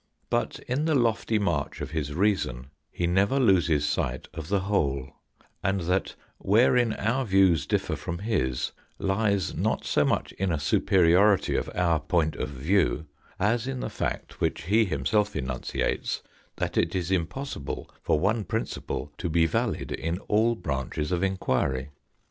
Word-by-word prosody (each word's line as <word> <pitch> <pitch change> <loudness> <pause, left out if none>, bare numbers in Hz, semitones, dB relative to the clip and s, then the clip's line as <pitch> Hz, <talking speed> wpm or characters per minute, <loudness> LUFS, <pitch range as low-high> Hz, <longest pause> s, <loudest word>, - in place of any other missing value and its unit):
But - - 0
in 135 +5 0
the 160 -2 +2
lofty 115 -3 +2
march 100 -6 -1
of - - -5
his 75 -2 -3
reason 75 - 0 0.2
he 90 - -2
never 100 +9 +2
loses 85 - +3
sight 75 - -1
of 80 -2 -6
the 100 +1 +1
whole; 70 -9 0 0.5
and 95 -1 +1
that 90 +3 0 0.2
wherein 115 +2 +4
our 125 +6 0
views 95 - +3
differ - - 0
from 85 - -5
his 90 - -1 0.3
lies 100 -1 0
not - - -1
so - - +2
much - - 0
in 95 -1 -2
a 80 - 0
superiority 95 +6 +4
of - - -1
our 85 -3 +2
point 80 +1 0
of - - -3
view, 75 +3 +1 0.3
as 115 +5 +1
in 135 -1 -3
the - - -4
fact - - -4
which - - 0
he 110 +6 +3
himself 100 +6 0
enunciates 65 -3 -2 0.3
that - - -3
it 85 +2 +1
is 90 -1 -1
im 90 -4 +2
possible 135 - -5
for 75 - +1
one 105 +6 +1
principle 110 -8 -4
to 85 - -2
be 80 +1 +3
valid 80 - -1
in 85 +2 -2
all 115 +3 +2
branches 70 - -3
of 90 -1 0
enquiry. 65 -8 0
90 Hz, 160 wpm, -27 LUFS, 75-105 Hz, 0.5 s, wherein